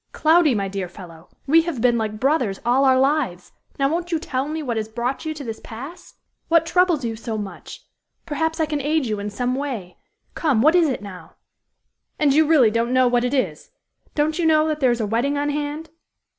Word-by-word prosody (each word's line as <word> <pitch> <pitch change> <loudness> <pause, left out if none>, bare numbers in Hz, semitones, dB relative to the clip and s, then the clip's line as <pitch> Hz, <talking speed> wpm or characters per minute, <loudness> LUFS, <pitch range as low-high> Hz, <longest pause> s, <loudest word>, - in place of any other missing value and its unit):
"Cloudy, 315 -4 +4
my 200 -2 -1
dear 195 -2 -4
fellow, 170 -3 -13 0.2
we 320 +4 +5
have 325 -6 -4
been 240 0 +3
like 215 -2 -2
brothers 255 -7 +1
all 255 +3 +3
our 260 -1 +4
lives; 265 - 0 0.3
now 275 - +2
won't 340 +4 -2
you 330 - +2
tell 285 -5 -3
me 310 +1 -4
what 245 -4 -2
has 220 -1 -3
brought 240 +7 -3
you 315 - -2
to 295 - -7
this 225 -3 -6
pass? 270 +10 -10 0.3
What 330 -1 +3
troubles 345 -5 +2
you 225 -1 -3
so 225 0 -5
much? 205 -2 -8 0.4
Perhaps 320 +1 -2
I 320 - +2
can 300 -1 -3
aid 300 +1 0
you 215 -3 -2
in 205 +1 -4
some 245 +5 -2
way. 255 -10 -5 0.4
Come, 270 -9 +1
what 310 +3 +5
is 345 -4 +4
it 255 - -3
now?" 180 -5 -11 0.8
"And 295 -3 +3
you 310 +1 +4
really 275 -9 +5
don't 230 +2 0
know 255 -1 +4
what 245 0 +2
it 250 +3 0
is? 260 - -2 0.5
Don't 310 +3 0
you 340 - +1
know 310 0 +4
that 305 -1 -2
there 260 -3 +3
is 240 -1 0
a - - 0
wedding 240 +7 0
on 290 0 0
hand?" 295 +2 -4
270 Hz, 220 wpm, -22 LUFS, 225-310 Hz, 0.8 s, we